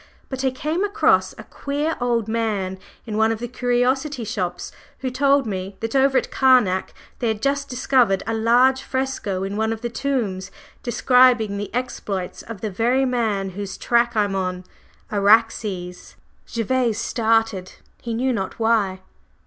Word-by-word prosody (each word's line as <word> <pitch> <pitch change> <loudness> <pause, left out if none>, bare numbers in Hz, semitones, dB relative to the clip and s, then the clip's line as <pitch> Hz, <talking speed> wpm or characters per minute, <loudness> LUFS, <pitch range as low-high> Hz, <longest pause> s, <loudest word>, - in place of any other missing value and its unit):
But 265 0 -4
I 265 - +3
came 305 +8 -2
across 410 +1 +2
a - - -11
queer 290 +3 -3
old 235 -3 0
man 210 -5 -2 0.3
in 215 -2 -4
one 220 +1 +3
of 225 - -1
the 240 +2 -5
curiosity 250 +3 0
shops 185 -5 -3 0.3
who 260 -1 -2
told 275 +1 +3
me 190 -2 -4
that 225 +3 -4
over 270 0 +4
at - - -1
Karnak 245 -9 +3 0.2
they 240 - -1
had 220 -1 -1
just 280 +3 -1
discovered 250 -5 +2
a 225 - -2
large 245 +4 +3
fresco 260 -9 -2
in 195 +1 -3
one 220 0 0
of 225 -1 -4
the 240 -1 -3
tombs 225 -9 -2 0.3
describing 245 -3 +4
the 205 - -5
exploits 210 -7 -4
of 220 -4 -9
the 215 - -3
very 245 +7 +2
man 220 -6 -1
whose 200 +1 -6
track 235 0 +1
I'm 205 -2 +1
on 185 -1 -2 0.5
Araxes 205 -3 +1 0.2
…" - - -38
Gervase 235 0 0
started, 225 -4 0 0.3
he 235 -1 -4
knew 255 +2 +1
not 195 -4 -3
why. 215 -5 +1
230 Hz, 160 wpm, -22 LUFS, 200-255 Hz, 0.5 s, over